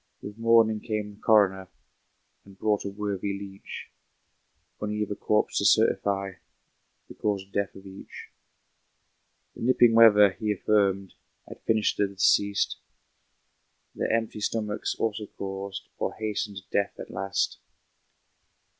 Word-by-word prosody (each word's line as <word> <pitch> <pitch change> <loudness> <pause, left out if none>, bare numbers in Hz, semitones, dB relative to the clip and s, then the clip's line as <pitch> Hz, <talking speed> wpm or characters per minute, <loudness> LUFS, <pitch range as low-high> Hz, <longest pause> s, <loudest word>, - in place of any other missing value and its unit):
With 105 +2 -9
morning 115 -1 +4
came 105 -2 -4
the 100 - -21
coroner, 95 -4 +3 0.8
And 100 -1 -17
brought 105 0 0
a - - -2
worthy 100 -1 -3
leech, 100 -1 -9 0.9
On 105 0 -2
either 105 -1 -2
corpse 105 +1 0
to - - -1
certify 100 -1 +2 0.8
The - - -11
cause 100 -2 -2
of 100 - -30
death 100 -2 -2
of 95 - -13
each. 95 0 -11 1.2
The - - -11
nipping 120 -1 +4
weather, 105 -3 +7
he 105 +2 -3
affirmed, 100 -1 +1 0.3
Had - - -11
finished 110 -1 +2
the 100 - +2
deceased. 100 +1 +2 1.2
Their - - -2
empty 115 -1 -1
stomachs 105 0 -2
also 110 -1 -2
caused, 95 0 -6
Or - - -2
hastened 105 -2 -4
death 100 0 0
at - - -9
last. 95 0 -2
105 Hz, 130 wpm, -27 LUFS, 100-110 Hz, 1.2 s, weather